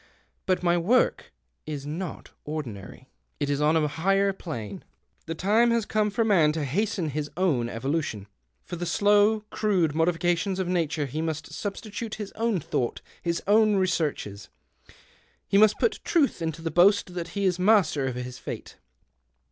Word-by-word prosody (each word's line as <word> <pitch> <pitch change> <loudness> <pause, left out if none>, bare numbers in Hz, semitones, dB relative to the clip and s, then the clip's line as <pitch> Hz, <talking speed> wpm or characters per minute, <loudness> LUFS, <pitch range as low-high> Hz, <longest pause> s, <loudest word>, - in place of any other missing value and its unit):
But 185 -1 +1
my 175 0 +3
work 230 +9 +1 0.4
is 145 -2 -5
not 165 +4 -6
ordinary; 130 -5 -7 0.3
it 145 -1 -1
is 145 +1 0
on 150 +2 +3
a 155 -1 +2
higher 195 +6 +1
plane. 115 - -7 0.4
The 165 - -3
time 215 +7 +3
has 230 -2 +1
come 215 0 +1
for 210 +3 0
man 170 -8 +4
to 155 -2 -2
hasten 175 +2 -1
his 150 +1 -3
own 145 -11 +1
evolution. 130 -4 -2 0.4
For 175 - -7
the 175 +1 -3
slow, 205 +2 +3
crude 185 -8 +1
modifications 175 +3 +1
of 190 -2 -1
Nature 165 -4 0
he 145 +4 -4
must 155 -2 -4
sub 200 -2 -4
stitute 215 +1 -6
his 210 -2 -6
own 225 -4 0
thought, 125 -5 -2 0.2
his 170 -1 -2
own 215 +1 +4
researches. 155 - -1 1.0
He 195 - +3
must 215 0 +5
put 455 - +1
truth 315 - +1
into 165 0 -3
that 165 - -2
boast 185 +2 +4
that 175 +2 -6
he 200 - +1
is 180 -1 +1
master 180 -9 +3
of 130 - -3
his 125 0 -6
fate." - - -7
175 Hz, 165 wpm, -26 LUFS, 150-200 Hz, 1.0 s, must